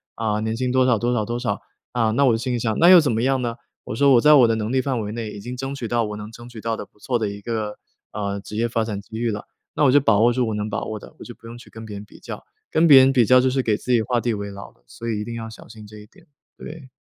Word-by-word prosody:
啊， 110 -2 -1
年 110 +1 -2
薪 125 0 -1
多 130 0 +3
少 125 -3 +3
多 120 +2 0
少 115 -3 0
多 120 +2 -3
少。 105 -5 -2 0.3
啊， 115 -3 +1
那 140 +5 +2
我 125 - +4
就 - - +1
心 125 +2 -3
里 120 - -1
想： 110 -1 -1
“那 170 - +6
又 185 -1 +10
怎 150 - 0
么 115 +1 -1
样 135 0 +1
呢？” 120 -1 -3 0.3
我 105 - -5
说： 140 +3 +4
“我 120 - +5
在 150 +3 +6
我 125 -4 +6
的 115 - +1
能 110 0 -3
力 130 - +2
范 130 -3 -2
围 105 -1 -5
内 110 -1 -5
已 105 - -9
经 125 +4 -6
争 135 +2 -4
取 125 -4 -5
到 120 +1 0
我 105 0 -6
能 105 +1 -8
争 120 +1 -12
取 120 -3 -10
到 115 0 -2
的 - - -6
不 105 - -31
错 125 +3 -1
的 110 -2 -1
一 100 0 -8
个， 110 -1 -4 0.4
呃， 100 -1 -3
职 100 +2 -10
业 115 +2 0
发 115 -1 -1
展 105 -3 -4
机 110 +2 -10
遇 115 0 -1
了。” 105 0 -6 0.3
那 150 - +1
我 135 - +5
就 145 - +6
把 110 -7 +3
握 120 +2 +4
住 125 -1 0
我 110 - -2
能 105 0 -3
把 100 - -3
握 110 - -5
的， - - -14
我 - - -9
就 120 - -10
不 - - -20
用 115 +1 -9
去 120 - -15
跟 115 0 -10
别 105 -2 -8
人 100 - -9
比 - - -17
较， - - -8 0.3
跟 165 +1 +3
别 140 -4 +9
人 130 +1 +5
比 125 -4 +4
较 130 +3 +6
就 130 - +2
是 130 +1 0
给 110 -3 +1
自 125 - -5
己 120 -2 +4
画 120 +2 0
地 120 0 -1
为 100 -1 -5
牢 100 0 -10
的， - - -34
所 115 - -9
以 110 -2 -2
一 - - -3
定 115 - -6
要 115 -1 -6
小 110 - -13
心 110 -1 -12
这 105 +1 -13
一 105 0 -13
点， - - -22 0.3
对。 150 -4 -10
115 Hz, 365 characters per minute, -22 LUFS, 105-125 Hz, 0.4 s, 又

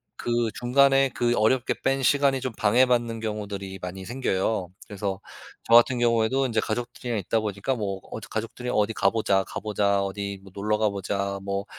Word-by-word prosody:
그 120 -1 0
중간에 135 +2 +4
그 120 0 +1
어렵게 120 +3 +2
뺀 135 0 +1
시간이 140 -1 +3
좀 130 -2 -3
방해받는 120 +1 +2
경우들이 100 -3 -5
많이 95 +1 -6
생겨요. 105 -6 -1 0.2
그래서 100 -1 -4 0.4
저 115 - 0
같은 120 +1 +6
경우에도 120 +3 +2
인제 115 -3 0
가족들이랑 120 0 -3
있다 110 +4 0
보니까 105 +5 -2
뭐 100 -4 -3
어디 110 - -7
가족들이랑 120 +3 -4
"어디 105 +1 +2
가 100 - +3
보자, 100 -3 +1
가 - - -6
보자. 100 -2 +1
어디 100 0 -4
뭐 95 -1 -15
놀러 105 +2 0
가 110 0 +2
보자. 100 0 -3
뭐 100 0 -3
110 Hz, 370 characters per minute, -25 LUFS, 100-120 Hz, 0.4 s, 같은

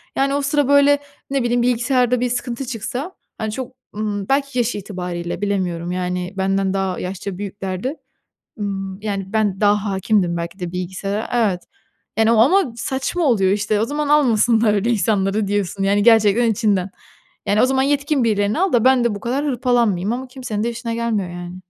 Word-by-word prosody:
yani, 275 +1 +1
o 285 - 0
sıra, 285 0 +1
böyle, 285 0 +5 0.3
ne 275 -2 0
bileyim, 240 0 +1
bilgisayarda 250 0 +2
bir 250 - 0
sıkıntı 245 +1 -3
çıksa, 255 - -4 0.3
hani, 220 -1 -3
çok, 255 +3 -5 0.2
ımm, 205 -2 -3
belki 275 -1 0
yaş 240 0 +1
itibarıyla 180 -3 -5
bilemiyorum, 180 -4 -1
yani, 180 +1 -3
benden 195 0 +1
daha 190 -2 -1
yaşça 185 0 -5
büyüklerdi, 200 - -4 0.6
ımm, 195 -1 -4
yani, 200 -1 -4
ben 210 -2 0
daha 205 0 +2
hâkimdim 190 -3 +1
belki 170 +3 -5
de 175 -1 -4
bilgisayara, 190 +3 -3
evet, 205 -7 +1 0.6
yani, 225 +1 +4
o 230 - +3
ama 275 - +4
saçma 265 +8 -2
oluyor 205 -9 +3
işte. 210 +1 0
O 220 - +2
zaman 295 +2 -2
almasınlar 230 -6 +4
öyle 210 +3 0
insanları 205 -2 +1
diyorsun, 200 -1 -1
yani, 200 +1 +2
gerçekten 225 0 +5
içinden. 200 -4 +1 0.6
Yani, 205 +2 +2
o - - +6
zaman 265 0 +1
yetkin 285 -1 +1
birilerini 210 +3 +1
al 380 -5 +1
da 235 - +4
ben 260 -2 +5
de 235 -3 +1
bu 200 - -6
kadar 265 +6 -2
hırpalanmayayım 240 -7 +1
ama 260 +2 -5
kimsenin 250 -5 -4
de 235 - 0
işine 230 0 -4
gelmiyor, 225 -5 -1
yani. 175 +1 -7
215 Hz, 175 wpm, -20 LUFS, 195-250 Hz, 0.6 s, o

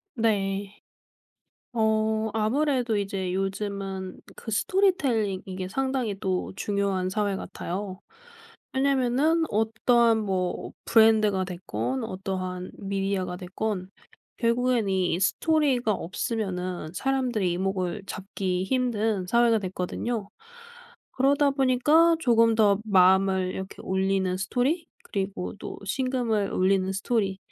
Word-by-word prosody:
네. 200 -3 0 1.0
어 220 -1 +1
아무래도 245 +1 +1
이제 195 -2 -2
요즘은 195 -1 -3 0.2
그 - - -9
스토리텔링 235 - +1
이게 185 -1 -5
상당히 260 -2 -1
또 185 -2 -2
중요한 195 -2 -1
사회 205 0 0
같아요. 190 +1 -5 0.7
왜냐하면은 275 +4 +2
어떠한 225 +2 +3
뭐 190 -4 -2
브랜드가 215 -4 +4
됐건 130 - -3
어떠한 185 -1 -4
미디어가 195 -2 -2
됐건 185 +1 -4 0.5
결국엔 235 -2 +1
이 185 -2 +1
스토리가 265 - +2
없으면은 185 -4 -3
사람들의 250 -5 0
이목을 185 0 -2
잡기 190 -2 -3
힘든 220 -4 0
사회가 235 +1 +4
됐거든요. 200 +3 -3 0.8
그러다 280 +2 +3
보니까 280 +5 +4
조금 230 -5 +4
더 205 -3 +4
마음을 190 -1 +4
이렇게 190 0 -7
울리는 190 -1 0
스토리 255 - 0 0.2
그리고 195 -2 -4
또 - - -7
심금을 235 -3 0
울리는 190 0 +2
스토리 195 -1 0
205 Hz, 260 characters per minute, -26 LUFS, 190-240 Hz, 1.0 s, 브랜드가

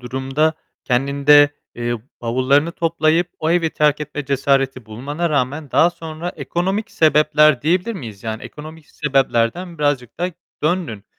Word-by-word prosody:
durumda 135 +5 -1 0.3
kendinde, 140 +3 +4 0.2
eee, 120 0 -2 0.3
bavullarını 130 +7 +1
toplayıp 165 +1 +1
o 160 0 -1
evi 165 -2 +2
terk 150 -1 +2
etme 150 -1 -5
cesareti 135 -2 0
bulmana 145 +10 -3
rağmen 145 +1 -1
daha 170 +2 +4
sonra 165 0 -7
ekonomik 195 +6 -2
sebepler 150 -3 +4
diyebilir 180 +8 +1
miyiz? 110 - -8
Yani 110 -1 -5
ekonomik 155 +1 -10
sebeplerden 140 +4 0
birazcık 145 -5 -1
da 180 +1 -1 0.3
döndün. 155 - -1
150 Hz, 130 wpm, -19 LUFS, 130-165 Hz, 0.3 s, kendinde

